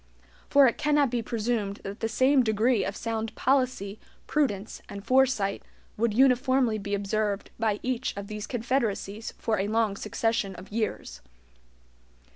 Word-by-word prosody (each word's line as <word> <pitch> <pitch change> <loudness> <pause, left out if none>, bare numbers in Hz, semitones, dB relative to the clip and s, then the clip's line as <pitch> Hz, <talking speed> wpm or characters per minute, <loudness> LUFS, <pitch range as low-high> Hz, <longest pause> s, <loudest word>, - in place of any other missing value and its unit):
For 280 -1 +7
it 235 - +1
cannot 295 -3 +3
be 240 -1 0
presumed 220 -3 -2
that 200 +2 -6
the 225 - -1
same 260 +4 +4
degree 220 -1 +2
of 195 - -3
sound 225 -1 -3
policy, 255 -6 0 0.3
prudence, 220 -9 -1
and 200 -1 -8
foresight 255 -7 +2 0.3
would 230 +1 +1
uniformly 255 -1 +3
be 200 0 -2
observed 200 0 -2
by 215 -2 +1
each 255 -3 -2
of 200 - -4
these 210 0 -6
confederacies 225 -4 -2
for 220 -3 -1
a 195 - 0
long 220 -1 +1
succession 210 -1 -1
of 185 +3 -11
years. 220 0 -3
225 Hz, 145 wpm, -27 LUFS, 205-255 Hz, 0.3 s, For